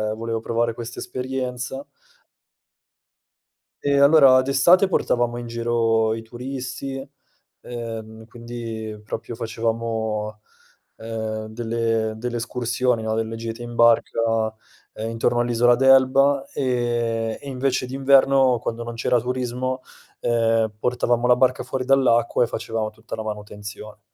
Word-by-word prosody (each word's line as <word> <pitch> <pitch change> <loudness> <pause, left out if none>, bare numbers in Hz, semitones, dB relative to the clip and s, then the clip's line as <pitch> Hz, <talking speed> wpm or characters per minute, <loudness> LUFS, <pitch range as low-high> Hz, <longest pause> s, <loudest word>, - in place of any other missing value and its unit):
volevo 115 0 -3
provare 115 0 -1
questa 120 0 -7
esperienza. 130 +1 -4 2.0
E 140 0 +2
allora 140 -3 +7
d'estate 170 +9 +4
portavamo 120 -9 +1
in 120 0 -6
giro 115 -1 +1
i 115 - -6
turisti, 130 +3 -6 0.5
ehm, 110 -2 -7
quindi 115 -2 -7
proprio 115 +2 -6
facevamo, 110 -1 -3 0.6
ehm, 110 -1 -4
delle 115 -1 -1
delle 120 +1 -4
escursioni, 120 0 -1
no, 110 0 -1
delle 115 0 -2
gite 115 +1 -6
in 120 0 -7
barca, 115 0 +4 0.7
uhm, 110 +1 -4
intorno 115 +1 0
all'isola 120 0 +3
d'Elba, 135 +2 +4
ehm, 120 -3 -1
e 140 - -11
invece 130 -1 -1
d'inverno 135 -1 +4
quando 115 +1 -4
non 120 0 -6
c'era 120 +1 +2
turismo, 125 +1 -2 0.4
uhm, 115 -1 +2
portavamo 120 +1 0
la 125 0 +6
barca 130 0 +2
fuori 130 -1 -3
dall'acqua 125 -3 +3
e - - 0
facevamo 110 -2 -3
tutta 110 +2 -9
la 110 - -5
manutenzione. 105 0 -8
120 Hz, 120 wpm, -23 LUFS, 115-130 Hz, 2.0 s, allora